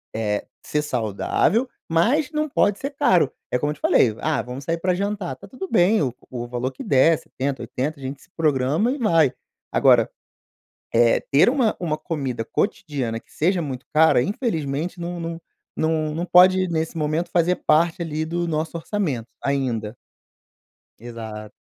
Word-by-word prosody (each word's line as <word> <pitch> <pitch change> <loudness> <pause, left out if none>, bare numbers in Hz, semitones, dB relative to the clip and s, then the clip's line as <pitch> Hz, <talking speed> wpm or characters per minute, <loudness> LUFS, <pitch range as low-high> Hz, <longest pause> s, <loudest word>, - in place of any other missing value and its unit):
eh, 105 -2 -1 0.2
ser 150 - 0
saudável 140 - 0 0.2
mas 250 - +2
não 305 -1 -1
pode 205 -6 +2
ser 275 - -3
caro. 180 - +3 0.2
É 125 - +1
como 145 - 0
eu - - -5
te - - -21
falei, 110 -4 +4
"ah 155 -2 0
vamos 125 +3 -7
sair 165 +4 -1
para 180 +1 +1
jantar," 200 -5 -2
tá - - -14
tudo 275 +9 -7
bem 185 +4 +4
o 130 -5 0 0.2
o 120 -1 -5
valor 125 +2 -3
que 130 - -9
der 145 +4 +4
70, 135 0 -4
80 140 +4 -3
a - - -13
gente 135 +1 -6
se - - -21
programa 155 - +1
e 280 - -2
vai. 165 - +3 0.4
Agora, - - +4 0.8
eh, 115 0 +4
ter 140 +10 +3
uma 250 -4 +1
uma 160 -3 -1
comida 135 -10 -3
cotidiana 135 - -2
que - - -28
seja 175 +3 +1
muito 135 -4 -5
cara, 160 -4 +5
infelizmente 165 - -2
não 175 +1 -4
não 165 0 -5 0.3
não 155 -1 0
não 170 +2 -2
pode 185 +1 +6
nesse 160 -1 -2
momento 155 +3 -1
fazer 175 +1 +3
parte 165 +3 +3
ali 155 -1 -2
do 170 +2 -2
nosso 160 +1 -2
orçamento, 160 - -2 0.2
ainda. 125 -6 -1 1.1
Exato. 110 -2 -8
155 Hz, 170 wpm, -23 LUFS, 130-180 Hz, 1.1 s, pode